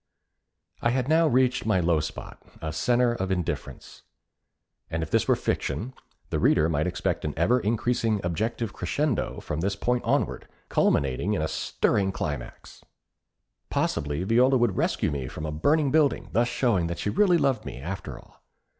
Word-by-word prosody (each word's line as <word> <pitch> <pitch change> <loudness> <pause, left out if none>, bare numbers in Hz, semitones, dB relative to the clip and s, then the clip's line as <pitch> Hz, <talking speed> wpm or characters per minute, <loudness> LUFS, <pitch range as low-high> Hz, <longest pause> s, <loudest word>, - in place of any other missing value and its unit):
I 120 - +2
had 125 +1 0
now 160 +2 +4
reached 130 -2 +2
my 110 -4 +2
low 85 -2 +2
spot - - -7 0.2
a 80 -1 -4
centre 120 +8 +2
of 95 -5 -3
indifference; 90 -3 -4 0.9
and 80 0 -2
if 80 - -7
this - - +2
were - - +4
fiction, 125 +5 -2 0.4
the - - 0
reader 80 - +4
might 80 0 0
expect 90 0 -2
an 75 - -3
ever 115 +10 +3
increasing 115 0 0
objective 110 +6 -2
crescendo 130 - -1
from 75 - -4
this 100 +4 -1
point 125 +4 0
onward, - - 0 0.2
culminating 70 +10 +1
in 80 - -1
a - - 0
stirring 95 +4 0
climax. 75 -9 -6 0.9
Possibly 75 +4 -1
Viola 125 +6 +4
would 120 -6 +1
rescue - - 0
me 70 -3 -3
from 75 +3 -6
a 75 - -3
burning 145 - +2
building, 155 -2 +2
thus 120 +1 +2
showing 110 -10 +1
that 85 0 -4
she 105 - -2
really 180 - +4
loved 135 -5 +1
me, - - -7
after 95 +7 -6
all. - - -18
100 Hz, 165 wpm, -26 LUFS, 80-125 Hz, 0.9 s, now